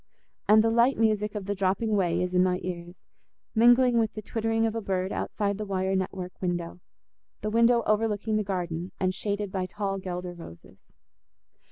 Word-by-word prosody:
And 215 Hz, +1 st, +7 dB
the 225 Hz, -, +2 dB
light 235 Hz, +4 st, +3 dB
music 215 Hz, -1 st, +1 dB
of 205 Hz, -2 st, -4 dB
the 205 Hz, -, -1 dB
dropping 200 Hz, +3 st, 0 dB
whey 175 Hz, -2 st, +1 dB
is 180 Hz, 0 st, -3 dB
in 180 Hz, -, +4 dB
my 180 Hz, 0 st, +2 dB
ears, 175 Hz, -1 st, -6 dB, 0.6 s
mingling 240 Hz, +1 st, +5 dB
with 220 Hz, -1 st, 0 dB
the 215 Hz, -, -6 dB
twittering 225 Hz, +1 st, 0 dB
of 225 Hz, -, 0 dB
a 225 Hz, -, -3 dB
bird 190 Hz, -1 st, -2 dB
outside 200 Hz, -1 st, -2 dB
the 215 Hz, -, -3 dB
wire 190 Hz, 0 st, 0 dB
network 185 Hz, -1 st, -4 dB
window—the 175 Hz, +3 st, -6 dB
window 235 Hz, +1 st, +4 dB
overlooking 215 Hz, 0 st, 0 dB
the 215 Hz, -, +1 dB
garden, 180 Hz, -2 st, -4 dB
and 185 Hz, 0 st, +1 dB
shaded 205 Hz, 0 st, -3 dB
by 185 Hz, -1 st, -2 dB
tall 195 Hz, -1 st, -3 dB
Guelder 180 Hz, -1 st, -5 dB
roses. 165 Hz, -, -13 dB
200 Hz, 175 wpm, -27 LUFS, 185-220 Hz, 0.6 s, And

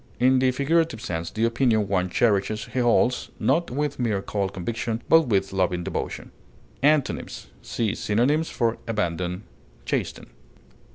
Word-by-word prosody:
In 130 Hz, +1 st, +4 dB
the 130 Hz, 0 st, +3 dB
figurative 140 Hz, 0 st, +1 dB
sense, 85 Hz, -7 st, -4 dB
the 110 Hz, +2 st, 0 dB
opinion 115 Hz, -3 st, +2 dB
one 90 Hz, -2 st, 0 dB
cherishes 105 Hz, +1 st, +1 dB
he 130 Hz, -, 0 dB
holds, 120 Hz, +1 st, +2 dB
not 170 Hz, +1 st, +1 dB
with 145 Hz, +2 st, -2 dB
mere 110 Hz, -5 st, 0 dB
cold 100 Hz, -2 st, -2 dB
conviction, 115 Hz, +5 st, -3 dB
but 165 Hz, -3 st, +5 dB
with 100 Hz, -3 st, 0 dB
loving 90 Hz, -2 st, 0 dB
devotion. -, -, -5 dB, 0.5 s
Antonyms: 150 Hz, 0 st, 0 dB
See 110 Hz, -4 st, -2 dB
synonyms 140 Hz, +10 st, +1 dB
for 115 Hz, -2 st, -1 dB
ABANDON; 90 Hz, -3 st, -2 dB, 0.4 s
CHASTEN. -, -, -2 dB
115 Hz, 135 wpm, -24 LUFS, 100-130 Hz, 0.5 s, but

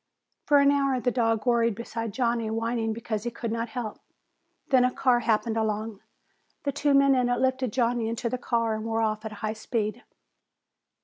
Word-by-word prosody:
For 290 Hz, -, +6 dB
an 280 Hz, 0 st, +5 dB
hour 275 Hz, -2 st, +1 dB
the 245 Hz, 0 st, 0 dB
dog 225 Hz, -2 st, 0 dB
worried 235 Hz, -3 st, +2 dB
beside 230 Hz, 0 st, -5 dB
Johnny, 235 Hz, -1 st, 0 dB
whining 225 Hz, 0 st, -1 dB
because 220 Hz, -1 st, -3 dB
he 240 Hz, -, -2 dB
could 235 Hz, -1 st, -5 dB
not 230 Hz, 0 st, -2 dB
help. 225 Hz, -3 st, -5 dB, 0.7 s
Then 260 Hz, -2 st, +5 dB
a 250 Hz, -, +3 dB
car 250 Hz, -1 st, +2 dB
happened 225 Hz, 0 st, 0 dB
along. 215 Hz, -1 st, -2 dB, 0.6 s
The 285 Hz, -, 0 dB
two 290 Hz, 0 st, +1 dB
men 275 Hz, 0 st, +5 dB
in 250 Hz, -2 st, +2 dB
it 245 Hz, -, +1 dB
lifted 260 Hz, -2 st, 0 dB
Johnny 240 Hz, -1 st, 0 dB
into 230 Hz, +1 st, -2 dB
the 250 Hz, +2 st, -2 dB
car 230 Hz, -2 st, 0 dB
and 215 Hz, 0 st, -4 dB
were 225 Hz, 0 st, 0 dB
off 215 Hz, 0 st, -1 dB
at 220 Hz, -, -4 dB
high 215 Hz, -, -1 dB
speed. 220 Hz, +1 st, -3 dB
235 Hz, 190 wpm, -27 LUFS, 225-250 Hz, 0.7 s, For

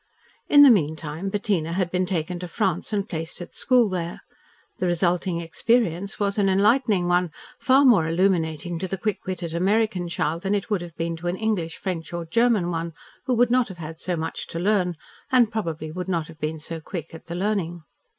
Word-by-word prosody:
In 290 Hz, -1 st, +9 dB
the 275 Hz, -, +9 dB
meantime 160 Hz, -1 st, 0 dB
Bettina 195 Hz, -5 st, -1 dB
had 180 Hz, -1 st, -1 dB
been 180 Hz, 0 st, 0 dB
taken 175 Hz, -1 st, -2 dB
to 180 Hz, -, -5 dB
France 185 Hz, +1 st, -1 dB
and 205 Hz, -1 st, -1 dB
placed 165 Hz, -2 st, -5 dB
at 175 Hz, -, -9 dB
school 250 Hz, -3 st, +3 dB
there. 175 Hz, -3 st, -4 dB, 0.6 s
The 185 Hz, -, +1 dB
resulting 175 Hz, 0 st, +1 dB
experience 195 Hz, +2 st, 0 dB
was 200 Hz, 0 st, 0 dB
an 195 Hz, -1 st, +3 dB
enlightening 205 Hz, -1 st, +3 dB
one, 175 Hz, 0 st, +2 dB, 0.3 s
far 270 Hz, +2 st, +5 dB
more 205 Hz, -11 st, +5 dB
illuminating 165 Hz, -2 st, 0 dB
to 190 Hz, -, -2 dB
the 195 Hz, -, -3 dB
quick 210 Hz, 0 st, -3 dB
witted 175 Hz, -3 st, -3 dB
American 190 Hz, 0 st, +1 dB
child 165 Hz, -1 st, -1 dB
than 195 Hz, +2 st, 0 dB
it 205 Hz, +2 st, -3 dB
would 200 Hz, -4 st, +1 dB
have 170 Hz, -2 st, -9 dB
been 165 Hz, 0 st, -2 dB
to 175 Hz, +2 st, -6 dB
an 175 Hz, -, 0 dB
English, 185 Hz, -7 st, -1 dB
French, 175 Hz, -4 st, -4 dB
or 170 Hz, -1 st, -3 dB
German 225 Hz, -2 st, +2 dB
one, 165 Hz, 0 st, -3 dB, 0.3 s
who 255 Hz, -, +2 dB
would 240 Hz, 0 st, +3 dB
not 250 Hz, -1 st, +3 dB
have 190 Hz, -4 st, -9 dB
had 160 Hz, 0 st, -8 dB
so 180 Hz, -, -2 dB
much 160 Hz, 0 st, -4 dB
to -, -, -6 dB
learn, 180 Hz, -1 st, +1 dB, 0.4 s
and 245 Hz, -4 st, +4 dB
probably 165 Hz, -8 st, -3 dB
would 180 Hz, +3 st, -5 dB
not 170 Hz, -4 st, 0 dB
have 160 Hz, -1 st, -13 dB
been 155 Hz, +1 st, -2 dB
so 165 Hz, +2 st, -6 dB
quick 165 Hz, +1 st, -7 dB
at 165 Hz, -, -11 dB
the 170 Hz, -, -5 dB
learning. 180 Hz, -4 st, -1 dB
180 Hz, 205 wpm, -24 LUFS, 165-205 Hz, 0.6 s, In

